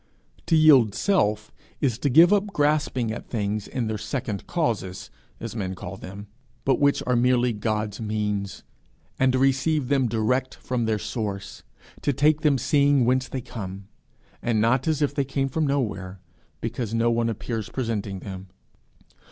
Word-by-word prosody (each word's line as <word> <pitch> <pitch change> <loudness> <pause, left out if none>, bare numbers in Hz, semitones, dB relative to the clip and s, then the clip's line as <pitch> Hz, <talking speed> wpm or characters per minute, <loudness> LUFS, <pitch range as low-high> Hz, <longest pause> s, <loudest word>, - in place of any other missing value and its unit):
To 165 - +3
yield 135 -10 +6
self 110 - +1 0.3
is 125 -5 0
to 140 - +1
give 165 +8 +7
up 205 0 +2
grasping 145 - +1
at 115 - -7
things 105 -2 -2
in 125 -3 -2
their 110 -1 -3
second 110 -4 -4
causes, 115 - -2 0.3
as 115 0 -6
men 95 -4 -3
call 90 +1 -7
them, 100 +2 -9 0.4
but 135 - +2
which 140 -1 +3
are 125 - +2
merely 125 0 +3
God's 105 0 -2
means, 105 -2 -2 0.6
and 130 0 +4
to 130 - +1
receive 135 +1 +2
them 135 -3 +3
direct 120 +4 0
from 125 -2 -2
their 110 -1 +1
source 100 -3 -5 0.4
to 145 - +1
take 150 +3 +3
them 145 -3 +3
seeing 140 0 +3
whence 130 +1 +2
they 130 - -4
come, 100 -5 -8 0.5
and 115 -2 +1
not 120 +5 +2
as 155 -2 +1
if 145 - 0
they 140 - +1
came 135 0 -1
from 155 +3 0
nowhere, 100 -9 -2 0.4
because 115 -1 -3
no 115 +1 +2
one 115 0 +1
appears 110 0 -4
presenting 105 -6 -3
them. 95 -1 -8
120 Hz, 165 wpm, -25 LUFS, 105-135 Hz, 0.6 s, give